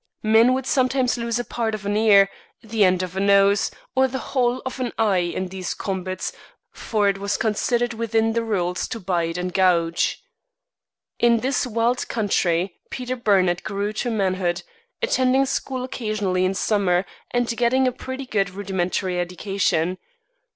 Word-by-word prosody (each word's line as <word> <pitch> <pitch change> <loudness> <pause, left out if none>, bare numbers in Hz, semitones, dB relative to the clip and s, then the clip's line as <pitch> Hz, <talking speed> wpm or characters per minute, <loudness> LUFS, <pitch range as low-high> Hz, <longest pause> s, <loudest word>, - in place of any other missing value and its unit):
Men 225 +4 +5
would 265 -1 -3
sometimes 255 -3 +1
lose 235 -1 -2
a 245 - -1
part 225 -2 -2
of 205 -1 -9
an 205 +1 0
ear, 205 -2 +6 0.4
the 220 -1 +1
end 185 -1 +3
of 185 0 -6
a - - -1
nose, 200 +1 +4 0.3
or 265 0 +4
the 265 +1 -4 0.2
whole 250 -1 +2
of 260 0 -5
an 250 -2 -2
eye 210 -4 +3
in 180 +1 -2
these 185 -1 -4
combats, 185 -1 -4 0.4
for 210 -3 0
it 195 -1 +1
was 200 +1 -1
considered 235 +2 0
within 225 0 0
the 230 - +1
rules 180 -5 -1
to 225 - -5
bite 175 -3 -1
and 180 0 -3
gouge. 170 -3 +2 1.0
In 235 -1 +4
this 260 0 0
wild 235 +2 0
country 185 -5 0
Peter 255 0 -4
Burnett 190 -7 +2
grew 205 +1 -2
to 240 - -2
manhood, 185 -5 0 0.4
attending 265 - +3
school 260 -1 -3
occasionally 210 -7 -1
in 190 +1 0
summer, 190 -3 +1 0.2
and 245 -1 0
getting 255 +2 +2
a - - +2
pretty 260 +2 -6
good 200 -5 0
rudimentary 185 -1 -2
education. 180 -1 -1
210 Hz, 160 wpm, -23 LUFS, 185-240 Hz, 1.0 s, ear